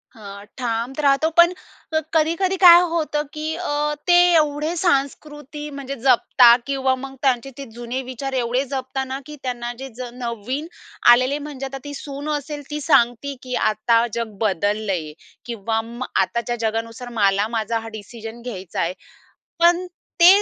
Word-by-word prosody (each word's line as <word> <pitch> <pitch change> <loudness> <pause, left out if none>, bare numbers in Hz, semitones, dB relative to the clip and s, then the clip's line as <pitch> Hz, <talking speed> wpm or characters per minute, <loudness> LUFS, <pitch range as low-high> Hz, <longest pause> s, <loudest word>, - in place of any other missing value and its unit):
हां, 200 -2 -10
ठाम 235 0 -2
तर 300 - -5
राहतो, 280 +3 +3
पण 345 +1 +7 0.6
कधी-कधी 335 +4 +2
काय 345 -1 +11
होतं, 300 -2 0
की 310 +1 -3
अ, 300 -3 -1
ते 350 0 +6 0.2
एवढे 300 +1 +1
सांस्कृती 295 -1 -2
म्हणजे 275 0 -5
जपतात 245 -1 +5
किंवा 265 -1 +1
मग 270 0 -7
त्यांचे 265 -1 +1
ते 280 - -6
जुने 240 +2 -4
विचार 270 +2 -5
एवढे 245 +3 0
जपतात 265 0 -3
ना, 265 +1 -4
की 300 +1 -9
त्यांना 240 -1 -3
जे 270 - -6
ज 250 0 -6
नवीन 250 +5 -4 0.5
आलेले 255 +4 +2
म्हणजे 275 -2 -6
आता 270 0 -6
ती 290 0 -7
सून 285 +1 -6
असेल 290 +1 -7
ती 300 0 -4
सांगते, 270 -1 +2
की 250 -1 -4 0.2
आता 230 +2 +2
जग 225 -3 -4
बदललंय 200 -4 -1 0.3
किंवा 225 -1 -2
मग 235 +3 -7 0.2
आताच्या 235 0 -1
जगानुसार 230 +2 -5
मला 200 +1 +3
माझा 225 +1 -1
हा 225 - -9
डिसिजन 225 +2 -10
घ्यायचा 195 -7 -5
आहे, 170 +2 -1 0.7
पण 345 +2 +4 0.3
ते 340 - +8
260 Hz, 155 wpm, -21 LUFS, 230-295 Hz, 0.7 s, काय